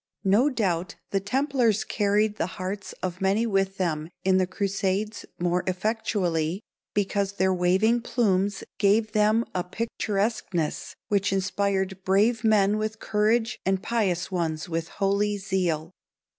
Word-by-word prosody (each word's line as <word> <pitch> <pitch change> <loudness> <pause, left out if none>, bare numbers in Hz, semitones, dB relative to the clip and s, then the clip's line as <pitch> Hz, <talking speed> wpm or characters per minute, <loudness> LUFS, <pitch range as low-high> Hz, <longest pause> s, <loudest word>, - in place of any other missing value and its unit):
No 215 +9 +4
doubt 185 - -1 0.2
the 195 - +2
templars 250 0 +1
carried 210 +1 +1
the - - 0
hearts 190 +2 -4
of 180 0 -3
many 195 +4 +2
with 195 -3 0
them 160 -4 -1
in 190 0 +4
the 185 -1 +2
crusades 200 +2 -2
more 175 +1 0
effectually 185 -4 0 0.4
because 200 -1 0
their 190 -1 +2
waving 190 +7 +2
plumes 200 -5 0 0.2
gave 210 +2 +3
them 215 +2 +3
a 180 - -1
picturesqueness 200 -4 -2
which 200 -1 +2
inspired 190 0 -1
brave 215 +5 +2
men 210 -1 +3
with 215 0 -3
courage 220 +3 +1
and 190 0 0
pious 195 -7 0
ones 160 -4 -2
with 165 -1 -2
holy 200 +1 0
zeal. 180 -5 -1
195 Hz, 130 wpm, -26 LUFS, 185-215 Hz, 0.4 s, No